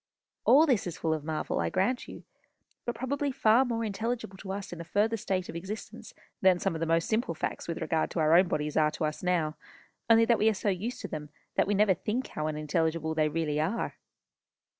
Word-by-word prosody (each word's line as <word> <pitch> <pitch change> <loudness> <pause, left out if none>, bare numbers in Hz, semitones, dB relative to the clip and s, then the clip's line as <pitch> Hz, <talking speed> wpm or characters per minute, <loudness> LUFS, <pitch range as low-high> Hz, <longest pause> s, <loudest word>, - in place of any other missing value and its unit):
All 295 +5 +7
this 250 - +1
is 175 - -5
full 160 -1 0
of 155 -2 -3
marvel, 155 0 -2
I - - 0
grant 195 +7 0
you; - - -10 0.6
but 240 - -2
probably 280 +3 -1
far 245 -1 +4
more 230 -3 -2
intelligible 220 0 -3
to 190 - -7
us 195 -2 -5
in 170 - -7
a - - -5
further 205 +7 +1
state 190 -3 -2
of - - -8
existence 190 +6 -7 0.3
than 185 -2 +5
some 175 - -1
of - - -3
the 165 - -1
most 165 0 +2
simple 220 -6 0
facts - - -4
with 170 - -3
regard 160 -2 0
to - - -3
our 155 0 +4
own 180 +1 +6
bodies 150 -2 -2
are 155 -1 +4
to 155 +1 -3
us 150 0 -3
now, 170 -4 0 0.5
only 230 0 +7
that 235 0 +3
we 220 - +5
are 220 - 0
so 205 - -1
used 200 +6 -3
to - - -4
them 150 -1 -6 0.2
that - - +2
we 205 - +1
never 205 -1 +4
think 225 +7 -3
how 155 0 -3
unintelligible 160 +1 -1
they 155 -1 +2
really 150 -1 -1
are." 185 +10 -1
185 Hz, 225 wpm, -29 LUFS, 160-220 Hz, 0.6 s, All